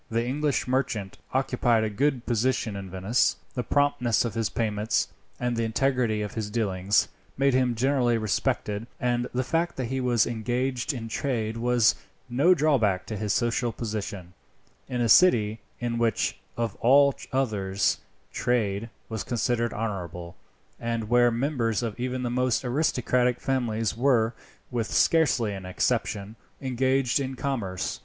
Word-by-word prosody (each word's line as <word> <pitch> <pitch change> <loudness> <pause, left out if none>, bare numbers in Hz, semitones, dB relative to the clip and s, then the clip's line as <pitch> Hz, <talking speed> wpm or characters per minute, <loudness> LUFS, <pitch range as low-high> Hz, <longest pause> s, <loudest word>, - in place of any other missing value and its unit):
The 115 +1 0
English 145 +2 0
merchant 115 -7 -1
occupied 125 -3 +2
a 110 - 0
good 130 +3 0
position 120 -2 0
in 100 -1 -6
Venice. 95 +6 +1 0.2
The 125 - -1
promptness 125 -3 +1
of 115 - -3
his 115 -1 -1
payments, 110 -1 0 0.3
and 125 -1 -1
the 115 - 0
integrity 115 -2 +1
of 105 - -5
his 110 -2 -3
dealings, 100 -3 +1 0.3
made 135 0 +3
him 125 -2 +2
generally 125 -1 +2
respected; 105 0 -1
and 120 0 0
the 130 +1 0
fact 165 +5 0
that 130 - -2
he 130 - -1
was 120 -3 +3
engaged 120 +3 -1
in 120 -5 -5
trade 115 -2 -2
was 120 -1 +3 0.3
no 140 +10 +4
drawback 115 - +2
to 110 - -5
his 105 0 -2
social 120 +1 +1
position, 105 -5 -5 0.5
in 125 -2 -2
a 120 - +2
city 110 - +5 0.2
in 120 -1 -2
which, 115 -4 0 0.2
of 115 -3 -2
all 140 +3 +5 0.2
others, 105 -7 0 0.3
trade 115 -3 0 0.2
was 110 -2 -4
considered 120 -1 0
honourable, 90 -6 -5 0.4
and 115 -2 -3
where 120 0 +5
members 120 -2 0
of 115 0 -4
even 125 +1 -2
the 120 - -1
most 125 0 +1
aristocratic 125 -2 +1
families 115 -5 -1
were, 120 -2 +2 0.4
with 115 -3 -1
scarcely 135 -10 +3
an 95 -2 -7
exception, 100 +3 -1 0.2
engaged 130 0 +1
in 135 -1 -3
commerce. 115 -9 -3
120 Hz, 150 wpm, -26 LUFS, 110-130 Hz, 0.5 s, city